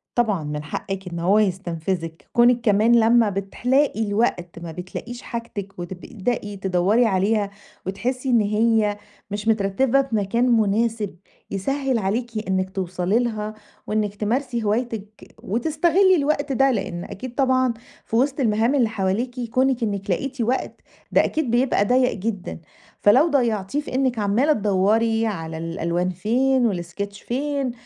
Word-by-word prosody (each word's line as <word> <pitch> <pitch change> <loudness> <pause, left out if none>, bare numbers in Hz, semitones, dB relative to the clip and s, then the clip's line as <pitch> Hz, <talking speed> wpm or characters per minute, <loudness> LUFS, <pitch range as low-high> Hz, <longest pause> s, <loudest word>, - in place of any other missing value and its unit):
طبعًا 210 -9 +1
من 150 0 -4
حقِّك 190 +4 -5
إن 170 -1 -5
هو 195 +5 +3
يتستنفذِك. 175 -3 -2
كُونِك 240 0 +5
كمان 225 +2 +4
لمّا 225 -1 +4
بتلاقي 225 +7 0
الوقت 200 -5 -1
ما 170 -1 -7
بتلاقيش 190 +8 -7
حاجتِك 215 -6 -6
وتبدئي 200 +4 -4
تدوّري 190 +5 +2
عليها 200 +1 +1 0.4
وتحسّي 250 +8 -2
إن 235 -2 +4
هي 210 0 +2 0.3
مش 210 +1 -4
مترتّبة 225 +5 +2
في 265 -5 -3
مكان 215 +4 +1
مناسب 220 -2 +1 0.4
يسهِّل 265 +6 -1
عليكِ 220 +2 -2
إنِّك 190 0 0
توصلي 185 +2 -1
لها 215 -3 -2 0.3
وإنِك 210 -1 -1
تمارسي 235 +3 -1
هوايتِك 215 -1 -3
وتستغلي 320 - +3
الوقت 285 -2 0
ده، 270 +1 +3
لإن 185 -6 -3
أكيد 245 +4 -8
طبعًا 260 -2 +2 0.3
في 225 - -4
وِسط 270 +4 +2
المهام 230 +2 +2
اللي 240 -5 +3
حواليكِ 220 +5 -2
كُونِك 255 -1 +2
إنِّك 200 -2 -3
لقيتِ 260 +8 -2
وقت، 245 +3 -1 0.3
ده - - +5
أكيد 305 -7 -1
بيبقى 240 -4 +2
ضيّق 250 +3 +3
جدًا. 195 - -4 0.4
فلو 260 +11 +6
ضيّعتيه 235 -3 0
في 255 - -7
إنِّك 260 -3 +1
عمّالة 220 +9 +3
تدوّري 220 +2 +2
على 160 -6 -4
الألوان 170 +2 -2
فين 240 +5 +1
والsketch 195 +4 -6
فين، 275 0 -1
220 Hz, 140 wpm, -23 LUFS, 195-250 Hz, 0.4 s, فلو